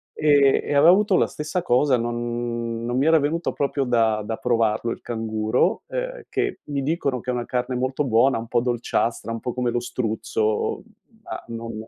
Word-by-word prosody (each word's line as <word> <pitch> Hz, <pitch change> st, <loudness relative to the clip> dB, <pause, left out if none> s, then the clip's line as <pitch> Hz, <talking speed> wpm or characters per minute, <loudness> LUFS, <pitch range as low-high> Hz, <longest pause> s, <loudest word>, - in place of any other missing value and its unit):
Ehm, 145 Hz, -3 st, +4 dB
e -, -, -2 dB
avevo 145 Hz, +3 st, +6 dB
avuto 200 Hz, 0 st, +3 dB
la -, -, +3 dB
stessa 155 Hz, +4 st, -3 dB
cosa, 130 Hz, -2 st, +3 dB
non 120 Hz, 0 st, -3 dB
non 120 Hz, +1 st, -2 dB
mi 135 Hz, -, +2 dB
era 160 Hz, 0 st, +5 dB
venuto 155 Hz, +4 st, -1 dB
proprio 140 Hz, 0 st, -1 dB
da 115 Hz, -4 st, +1 dB
da 110 Hz, +1 st, -4 dB
provarlo 115 Hz, -2 st, +1 dB
il -, -, -5 dB
canguro, 110 Hz, -2 st, 0 dB
ehm, -, -, -4 dB
che -, -, -2 dB
mi 140 Hz, -1 st, -2 dB
dicono 140 Hz, -3 st, -1 dB
che 125 Hz, -, -8 dB
è -, -, +1 dB
una 120 Hz, -1 st, -2 dB
carne 125 Hz, +1 st, -2 dB
molto 130 Hz, +3 st, -1 dB
buona, 120 Hz, +1 st, +3 dB
un 115 Hz, -, -7 dB
po' 120 Hz, -, +1 dB
dolciastra, 120 Hz, -2 st, -1 dB
un 115 Hz, -, -3 dB
po' 125 Hz, +1 st, -4 dB
come 125 Hz, -1 st, -1 dB
lo 120 Hz, 0 st, 0 dB
struzzo, 110 Hz, -3 st, -1 dB, 0.4 s
ma -, -, -7 dB
non 115 Hz, 0 st, -6 dB
125 Hz, 190 wpm, -23 LUFS, 115-140 Hz, 0.4 s, avevo